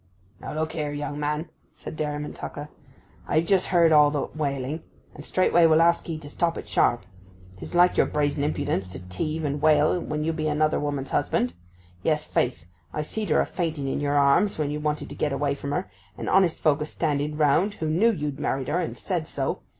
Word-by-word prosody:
'Now -, -, -7 dB
look 160 Hz, 0 st, -1 dB
here, 150 Hz, -2 st, -3 dB
young 145 Hz, 0 st, -4 dB
man,' 150 Hz, +2 st, -2 dB, 0.3 s
said -, -, -8 dB
Dairyman 150 Hz, -1 st, -3 dB
Tucker. 145 Hz, +1 st, -7 dB, 0.6 s
'I've 160 Hz, +2 st, +2 dB
just 190 Hz, 0 st, +2 dB
heard 170 Hz, -3 st, +4 dB
all 150 Hz, -1 st, +7 dB
that 145 Hz, 0 st, -3 dB
wailing—and 145 Hz, 0 st, -5 dB
straightway 175 Hz, -1 st, +4 dB
will 160 Hz, 0 st, +5 dB
ask 170 Hz, +1 st, +3 dB
'ee 160 Hz, -, -2 dB
to 155 Hz, -2 st, -10 dB
stop 170 Hz, +3 st, -1 dB
it -, -, -7 dB
sharp. 120 Hz, -5 st, +2 dB, 0.5 s
'Tis -, -, -8 dB
like 180 Hz, +1 st, +5 dB
your -, -, +4 dB
brazen 145 Hz, -1 st, 0 dB
impudence 120 Hz, -10 st, -1 dB
to -, -, -6 dB
teave 155 Hz, -, -3 dB
and 145 Hz, 0 st, -2 dB
wail 155 Hz, +3 st, +4 dB
when 150 Hz, -1 st, -3 dB
you 165 Hz, +1 st, 0 dB
be 155 Hz, -1 st, -2 dB
another 155 Hz, +1 st, +1 dB
woman's 145 Hz, -2 st, -3 dB
husband; 125 Hz, -5 st, 0 dB, 0.5 s
yes, 150 Hz, -, 0 dB
faith, 120 Hz, -10 st, -1 dB, 0.3 s
I 150 Hz, -, -2 dB
see'd 210 Hz, +5 st, -4 dB
her -, -, +4 dB
a -, -, 0 dB
fainting 160 Hz, -5 st, -3 dB
in 135 Hz, -, -1 dB
yer 145 Hz, 0 st, 0 dB
arms 145 Hz, +8 st, +3 dB
when 150 Hz, -2 st, -1 dB
you 150 Hz, -, -3 dB
wanted 150 Hz, 0 st, -2 dB
to -, -, -7 dB
get 145 Hz, -, -1 dB
away 140 Hz, +1 st, 0 dB
from 140 Hz, 0 st, -6 dB
her, 180 Hz, +5 st, -1 dB, 0.3 s
and -, -, -5 dB
honest 185 Hz, -3 st, +3 dB
folk 150 Hz, -1 st, +3 dB
a -, -, 0 dB
standing 150 Hz, -1 st, -2 dB
round 160 Hz, +7 st, +3 dB
who 160 Hz, -, -3 dB
knew 175 Hz, +9 st, +3 dB
you'd 150 Hz, -8 st, -4 dB
married 135 Hz, 0 st, -1 dB
her, 165 Hz, +4 st, +1 dB
and 175 Hz, -, -3 dB
said 170 Hz, -5 st, -3 dB
so. 135 Hz, -1 st, -3 dB
150 Hz, 210 wpm, -25 LUFS, 145-160 Hz, 0.6 s, all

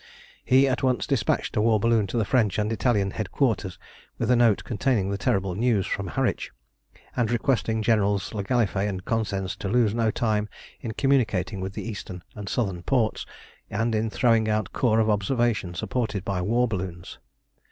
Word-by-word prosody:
He 135 Hz, +2 st, +4 dB
at 130 Hz, -1 st, 0 dB
once 130 Hz, -2 st, +1 dB
despatched -, -, 0 dB
a -, -, +2 dB
war 110 Hz, -1 st, +3 dB
balloon 115 Hz, -1 st, +2 dB
to 120 Hz, -, -3 dB
the 110 Hz, -, +1 dB
French 110 Hz, -4 st, +2 dB
and 105 Hz, +1 st, 0 dB
Italian 105 Hz, -5 st, +1 dB
headquarters 105 Hz, -2 st, -1 dB, 0.4 s
with -, -, 0 dB
a -, -, +6 dB
note 115 Hz, -4 st, +3 dB
containing 110 Hz, -4 st, 0 dB
the 100 Hz, -, -1 dB
terrible 95 Hz, -1 st, 0 dB
news 110 Hz, -1 st, +1 dB
from 100 Hz, -1 st, -3 dB
Harwich, -, -, -1 dB, 0.7 s
and 120 Hz, -3 st, +1 dB
requesting 115 Hz, -2 st, 0 dB
Generals 105 Hz, -3 st, +1 dB
le 105 Hz, -2 st, -2 dB
Gallifet 105 Hz, -3 st, +1 dB
and 95 Hz, -2 st, -5 dB
Cosensz 100 Hz, -4 st, -1 dB
to -, -, -4 dB
lose 115 Hz, -1 st, +3 dB
no 115 Hz, -1 st, +1 dB
time 105 Hz, -2 st, 0 dB, 0.3 s
in 115 Hz, -, -5 dB
communicating 105 Hz, -9 st, +1 dB
with 95 Hz, +1 st, -4 dB
the -, -, -5 dB
eastern 95 Hz, -5 st, -7 dB
and 105 Hz, -2 st, -7 dB
southern 95 Hz, -8 st, -1 dB
ports, 115 Hz, +2 st, 0 dB, 0.4 s
and 115 Hz, +2 st, -1 dB
in 110 Hz, +1 st, 0 dB
throwing 115 Hz, -1 st, +2 dB
out 105 Hz, -3 st, -1 dB
corps 115 Hz, -3 st, +2 dB
of 110 Hz, -, +3 dB
observation 105 Hz, -2 st, 0 dB
supported 105 Hz, +1 st, -2 dB
by 95 Hz, -2 st, -1 dB
war 120 Hz, +6 st, +2 dB
balloons. 90 Hz, -4 st, -5 dB
110 Hz, 175 wpm, -25 LUFS, 100-120 Hz, 0.7 s, a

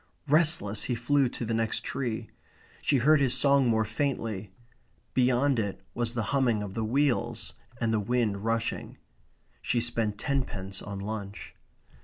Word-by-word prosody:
Restless, 150 Hz, -9 st, +3 dB
he 125 Hz, -, -1 dB
flew 130 Hz, +3 st, +2 dB
to 120 Hz, -, -5 dB
the 115 Hz, -, -1 dB
next 115 Hz, 0 st, 0 dB
tree. 120 Hz, -5 st, -3 dB, 0.5 s
She 140 Hz, -, +3 dB
heard 150 Hz, +5 st, +5 dB
his 130 Hz, -3 st, +3 dB
song 140 Hz, -2 st, +4 dB
more 110 Hz, -1 st, +2 dB
faintly. 110 Hz, -5 st, -2 dB, 0.6 s
Beyond 130 Hz, +1 st, +3 dB
it 100 Hz, -3 st, -2 dB
was 120 Hz, 0 st, -1 dB
the 120 Hz, -, 0 dB
humming 120 Hz, -6 st, +2 dB
of 100 Hz, -2 st, -6 dB
the 110 Hz, -, -2 dB
wheels 120 Hz, -1 st, 0 dB, 0.3 s
and 115 Hz, -1 st, +1 dB
the 110 Hz, -, +2 dB
wind 105 Hz, -2 st, 0 dB
rushing. 115 Hz, 0 st, -2 dB, 0.6 s
She 120 Hz, -, +1 dB
spent 115 Hz, -3 st, 0 dB
tenpence 105 Hz, -8 st, -2 dB
on 100 Hz, -1 st, -6 dB
lunch. 100 Hz, 0 st, -6 dB
115 Hz, 150 wpm, -28 LUFS, 110-130 Hz, 0.6 s, heard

